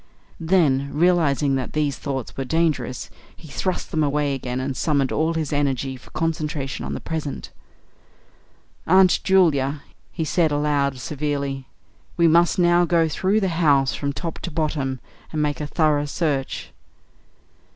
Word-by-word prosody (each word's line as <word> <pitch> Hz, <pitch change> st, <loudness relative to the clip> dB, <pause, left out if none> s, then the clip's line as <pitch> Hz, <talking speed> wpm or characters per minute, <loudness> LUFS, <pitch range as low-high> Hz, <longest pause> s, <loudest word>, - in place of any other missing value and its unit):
Then 155 Hz, -6 st, +2 dB
realising 150 Hz, -4 st, +2 dB
that 130 Hz, -, -4 dB
these 150 Hz, -3 st, 0 dB
thoughts 135 Hz, -4 st, -5 dB
were 135 Hz, -, -3 dB
dangerous, 140 Hz, -4 st, -1 dB, 0.2 s
he 160 Hz, -, -14 dB
thrust 185 Hz, +5 st, -3 dB
them 155 Hz, -2 st, +1 dB
away 145 Hz, 0 st, +1 dB
again 125 Hz, -1 st, -3 dB
and 130 Hz, +1 st, -3 dB
summoned 140 Hz, -2 st, +1 dB
all 160 Hz, +1 st, 0 dB
his 155 Hz, -3 st, -2 dB
energy 135 Hz, -2 st, 0 dB
for 125 Hz, -, -15 dB
concentration 155 Hz, -4 st, -3 dB
on -, -, -4 dB
the -, -, -4 dB
present. 155 Hz, -3 st, -5 dB, 1.4 s
"Aunt 185 Hz, +1 st, +5 dB
Julia," 150 Hz, -7 st, +2 dB, 0.3 s
he 160 Hz, -, -3 dB
said 160 Hz, -1 st, +2 dB
aloud, 145 Hz, -2 st, +1 dB
severely, 140 Hz, 0 st, -3 dB, 0.5 s
"we 170 Hz, -1 st, +5 dB
must 170 Hz, +2 st, +4 dB
now 175 Hz, -1 st, +4 dB
go 170 Hz, -2 st, +3 dB
through 190 Hz, +7 st, +1 dB
the 190 Hz, -, +1 dB
house 140 Hz, -4 st, +4 dB
from 140 Hz, -1 st, -2 dB
top 160 Hz, +4 st, -5 dB
to -, -, -5 dB
bottom 150 Hz, -5 st, -2 dB, 0.3 s
and 155 Hz, -, -3 dB
make 150 Hz, 0 st, -1 dB
a 150 Hz, -, -3 dB
thorough 150 Hz, -2 st, +2 dB
search." 145 Hz, -4 st, -2 dB
150 Hz, 150 wpm, -22 LUFS, 140-165 Hz, 1.4 s, Aunt